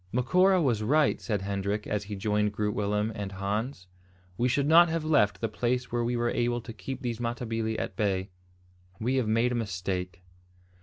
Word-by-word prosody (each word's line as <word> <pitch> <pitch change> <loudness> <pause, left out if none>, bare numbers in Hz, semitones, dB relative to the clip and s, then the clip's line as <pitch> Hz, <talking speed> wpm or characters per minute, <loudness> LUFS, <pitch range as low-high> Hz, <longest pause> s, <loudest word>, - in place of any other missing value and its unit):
"Macora 180 +10 +3
was 125 -9 +1
right," 150 +8 +2
said 105 -5 -2
Hendrik, 100 +1 -2
as 105 -1 -2
he 105 +1 -5
joined 105 +1 0
Groot 105 0 -1
Willem 105 +1 0
and 100 -2 -5
Hans. 100 +3 -3 0.5
"We 120 - +1
should 135 +3 +1
not 165 +3 +7
have 165 -1 -2
left 105 -10 +2
the 115 - +1
place 125 +3 -1
where 120 0 0
we 120 +1 0
were 120 0 0
able 120 0 0
to 115 0 -9
keep 130 +4 -7
these 120 -2 -2
Matabili 115 -2 -2
at - - -4
bay. 95 -2 -1 0.7
We 125 +4 0
have 125 -4 +1
made 115 +3 +2
a 120 -1 0
mistake." 90 -3 -4
115 Hz, 190 wpm, -28 LUFS, 105-125 Hz, 0.7 s, not